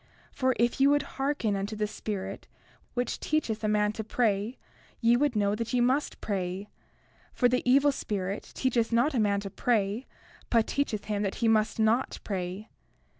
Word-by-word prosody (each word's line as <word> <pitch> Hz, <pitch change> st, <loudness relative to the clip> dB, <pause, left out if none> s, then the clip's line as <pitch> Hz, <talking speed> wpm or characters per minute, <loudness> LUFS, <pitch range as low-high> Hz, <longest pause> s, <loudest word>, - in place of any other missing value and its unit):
For 260 Hz, -2 st, +1 dB
if 240 Hz, +3 st, +1 dB
ye 275 Hz, -, +7 dB
would 290 Hz, 0 st, +3 dB, 0.2 s
hearken 270 Hz, -7 st, 0 dB
unto 200 Hz, +2 st, -3 dB
the 210 Hz, 0 st, 0 dB
Spirit 200 Hz, -2 st, -5 dB, 0.5 s
which 245 Hz, 0 st, -1 dB
teacheth 235 Hz, -8 st, -1 dB
a -, -, +1 dB
man 210 Hz, 0 st, +2 dB
to 220 Hz, -, -4 dB
pray 220 Hz, +1 st, 0 dB, 0.4 s
ye 235 Hz, 0 st, +4 dB
would 275 Hz, -1 st, +1 dB
know 205 Hz, -1 st, +2 dB
that 230 Hz, +3 st, -3 dB
ye 250 Hz, -, +3 dB
must 260 Hz, +5 st, +1 dB
pray; 190 Hz, 0 st, -3 dB, 0.6 s
for 245 Hz, -, +3 dB
the 250 Hz, +1 st, +1 dB
evil 280 Hz, +3 st, +5 dB
spirit 200 Hz, -6 st, -4 dB
teacheth 240 Hz, -3 st, +1 dB
not 240 Hz, +6 st, +3 dB
a 250 Hz, -, +1 dB
man 200 Hz, -2 st, +2 dB
to 195 Hz, -1 st, -6 dB
pray, 220 Hz, +1 st, 0 dB, 0.4 s
but 230 Hz, -2 st, +3 dB
teacheth 245 Hz, -7 st, -1 dB
him 205 Hz, -1 st, -1 dB
that 195 Hz, -2 st, -1 dB
he 230 Hz, -, 0 dB
must 220 Hz, 0 st, +2 dB
not 220 Hz, +4 st, +2 dB
pray. 190 Hz, +1 st, -4 dB
220 Hz, 175 wpm, -28 LUFS, 205-250 Hz, 0.6 s, ye